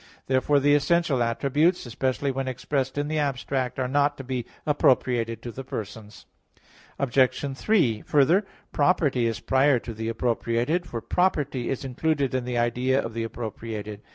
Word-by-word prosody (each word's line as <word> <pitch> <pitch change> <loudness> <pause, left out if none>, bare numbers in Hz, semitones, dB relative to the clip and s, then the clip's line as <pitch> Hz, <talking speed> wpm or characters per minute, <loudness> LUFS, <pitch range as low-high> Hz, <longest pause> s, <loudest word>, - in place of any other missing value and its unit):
Therefore 135 +2 +2
the 145 +1 +3
essential 145 -2 +2
attributes, 140 +9 +1
especially 130 +3 -1
when 135 0 -3
expressed 130 +1 -2
in 145 0 0
the 155 0 -1
abstract, 135 -2 -2
are 130 -1 0
not 145 +2 +1
to 135 - -7
be 125 -2 -4 0.2
appropriated 120 -6 +1
to 120 - -5
the 135 - -7
persons. 110 -3 -8 0.7
Obj. 135 +1 +1
3: 135 - +2
Further, 150 +8 +3 0.3
property 145 -6 +2
is 115 - -2
prior 135 0 +3
to 115 0 -6
the 110 +1 -4
appropriated, 120 +7 0
for 115 - -5
property 150 -8 0
is 135 0 -3
included 140 +1 0
in 130 -1 -1
the 125 -1 -2
idea 125 +3 +1
of 115 - -4
the 115 - -3
appropriated. 110 -2 -6
130 Hz, 155 wpm, -25 LUFS, 120-145 Hz, 0.7 s, the